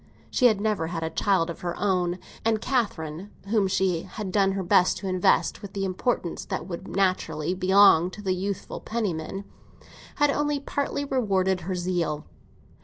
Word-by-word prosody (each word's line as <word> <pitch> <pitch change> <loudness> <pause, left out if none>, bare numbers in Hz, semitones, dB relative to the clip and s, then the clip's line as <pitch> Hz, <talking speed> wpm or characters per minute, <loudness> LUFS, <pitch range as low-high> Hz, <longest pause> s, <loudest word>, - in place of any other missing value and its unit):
She 250 - +5
had 215 -4 +2
never 210 -6 0
had 165 -1 -4
a 160 - -2
child 185 -4 +1
of 165 - -9
her 175 -1 -3
own, 180 -3 +1 0.3
and 225 -1 +2
Catherine, 200 - -2 0.2
whom 210 -3 +3
she 185 -3 +1
had 205 0 -6
done 195 -1 +3
her 195 -1 -2
best 180 +1 +4
to 195 - -5
invest 185 +1 +2
with 200 -1 -9
the 195 -1 -2
importance 185 -1 -1
that - - -4
would 185 +1 -7
naturally 185 -4 0
belong 185 -2 +5
to 205 +3 -10
a - - +3
youthful 195 +2 -3
Penniman, 195 -4 -3 0.7
had 290 -1 +3
only 295 0 0
partly 285 0 -2
rewarded 190 -8 +1
her 185 +3 -3
zeal. 175 -4 -1
190 Hz, 170 wpm, -26 LUFS, 180-210 Hz, 0.7 s, She